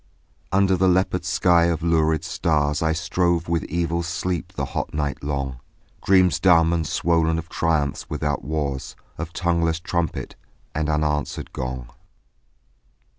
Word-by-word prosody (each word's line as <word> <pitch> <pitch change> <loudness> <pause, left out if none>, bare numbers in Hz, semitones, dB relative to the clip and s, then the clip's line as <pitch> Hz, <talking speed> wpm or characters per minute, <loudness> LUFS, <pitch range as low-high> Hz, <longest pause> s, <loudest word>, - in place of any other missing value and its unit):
Under 95 0 +3
the 95 +1 +2
leopard 90 0 +2
sky 85 -1 +3
of 85 -1 0
lurid 80 -2 +2
stars 75 -2 0
I 80 0 +2
strove 85 +1 0
with 85 -1 0
evil 85 +1 -1
sleep 85 +1 -3
the - - -2
hot - - -3
night 75 -2 -2
long, 70 -3 -3 0.4
Dreams 95 -2 +4
dumb 85 -3 +5
and 80 -2 0
swollen 80 -1 +1
of 80 +1 -6
triumphs 80 -4 -1
without 75 -3 -2
wars, 70 -2 -3 0.2
Of 80 0 -4
tongueless 85 -2 0
trumpet 85 -2 -3 0.4
and 80 0 -1
unanswering 75 -1 -1
gong. 65 -1 -5
80 Hz, 135 wpm, -23 LUFS, 75-85 Hz, 0.4 s, dumb